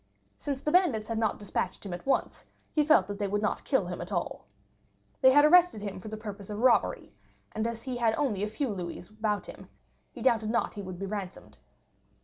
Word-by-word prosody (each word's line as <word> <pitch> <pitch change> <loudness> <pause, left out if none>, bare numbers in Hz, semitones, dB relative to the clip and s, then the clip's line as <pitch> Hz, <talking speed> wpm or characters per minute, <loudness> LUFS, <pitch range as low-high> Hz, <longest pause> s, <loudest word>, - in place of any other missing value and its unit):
Since 275 -2 -3
the 300 - -1
bandits 285 - +3
had 225 -1 -1
not 220 -2 +1
despatched 200 -2 -3
him 190 - -5
at 175 +8 -8
once, 275 - 0 0.3
he 305 - +3
felt 305 +1 +5
that 205 0 -6
they 205 - 0
would 205 +2 -1
not 210 - -1
kill - - +1
him - - -5
at - - -7
all. - - -3 0.7
They 260 - +8
had 290 +2 +7
arrested 350 - +5
him 200 -2 -5
for 200 - -10
the 215 0 -5
purpose 205 -2 -8
of 205 - -4
robbery, 245 +1 +2 0.4
and 220 +1 -1
as 230 -1 -5
he 255 -2 -4
had 230 -2 +2
only 235 -10 0
a 210 - 0
few 265 +5 -2
louis 180 -3 -5
about 215 -1 -2
him, - - -11 0.4
he - - -9
doubted 225 -4 +2
not 235 - 0
he 205 - -6
would 185 -2 -7
be 195 - -4
ransomed. 195 -2 -7
215 Hz, 220 wpm, -29 LUFS, 205-260 Hz, 0.7 s, They